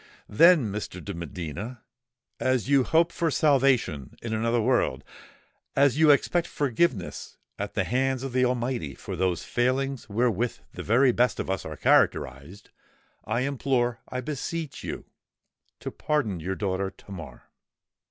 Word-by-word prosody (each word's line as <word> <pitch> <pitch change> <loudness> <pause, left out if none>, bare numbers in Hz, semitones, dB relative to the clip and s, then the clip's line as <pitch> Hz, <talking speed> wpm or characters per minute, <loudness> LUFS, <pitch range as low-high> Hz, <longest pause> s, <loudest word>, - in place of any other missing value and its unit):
Then, 150 - +5
Mr. 100 -2 -5
de 100 - -4
Medina,—as 120 - -5
you 140 -2 +4
hope 165 +5 +3
for 165 - 0
salvation 135 - +2
in 115 -1 -3
another 115 +2 +1
world,—as 130 +3 -1
you 160 -1 +6
expect 165 +4 +3
forgiveness 130 - -1 0.2
at - - -4
the - - +2
hands 130 +1 0
of 135 -2 -5
the 130 0 +3
Almighty 120 - -1
for - - -6
those 90 -2 0
failings 130 0 -1
wherewith 120 +1 0 0.2
the - - -6
very 125 +4 +4
best 125 +1 +1
of - - -2
us 95 - -3
are 80 -1 -6
characterised,—I 95 - -1
implore—I 125 -2 -1
beseech 150 +3 -5
you, - - -5 0.8
to - - -5
pardon 130 - -1
your 95 +4 -3
daughter 95 -1 -1
Tamar!" 85 -11 -11
120 Hz, 130 wpm, -26 LUFS, 100-135 Hz, 0.8 s, you